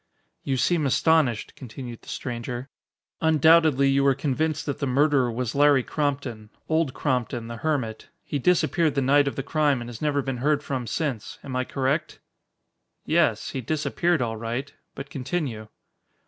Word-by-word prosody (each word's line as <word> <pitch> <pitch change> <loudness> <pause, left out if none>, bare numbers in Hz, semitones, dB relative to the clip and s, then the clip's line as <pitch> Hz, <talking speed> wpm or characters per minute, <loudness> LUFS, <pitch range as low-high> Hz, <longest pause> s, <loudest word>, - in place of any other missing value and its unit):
"You 135 -1 -1
seem 155 +2 +2
astonished," 135 -5 +2
continued 120 -1 -8
the - - -14
stranger. 120 +2 -5 0.5
"Undoubtedly 160 -3 +5
you 135 0 +3
were 135 -1 +4
convinced 145 +2 -1
that 145 - -3
the 140 - -1
murderer 135 -1 +3
was 120 0 -3
Larry 145 -2 +4
Crompton 135 -8 -3 0.2
Old 160 -4 +1
Crompton, 125 -4 -1
the 115 0 -6
hermit. 125 -6 -2
He 145 - -3
disappeared 165 0 +2
the 140 - +1
night 140 +2 +4
of 140 - -2
the 135 - -3
crime 145 -2 +1
and 120 - -7
has 115 - -10
never 145 -2 +1
been 135 -1 -3
heard 145 +4 +1
from 130 -4 -3
since. 130 -2 -3
Am 130 -2 -6
I 130 0 0
correct?" 140 +5 -1 0.9
"Yes. - - +1
He 130 - -3
disappeared 155 +3 0
all 115 -1 -3
right. 120 +5 -4 0.2
But 140 +1 -8
continue." 130 -5 -3
135 Hz, 160 wpm, -25 LUFS, 125-150 Hz, 0.9 s, Undoubtedly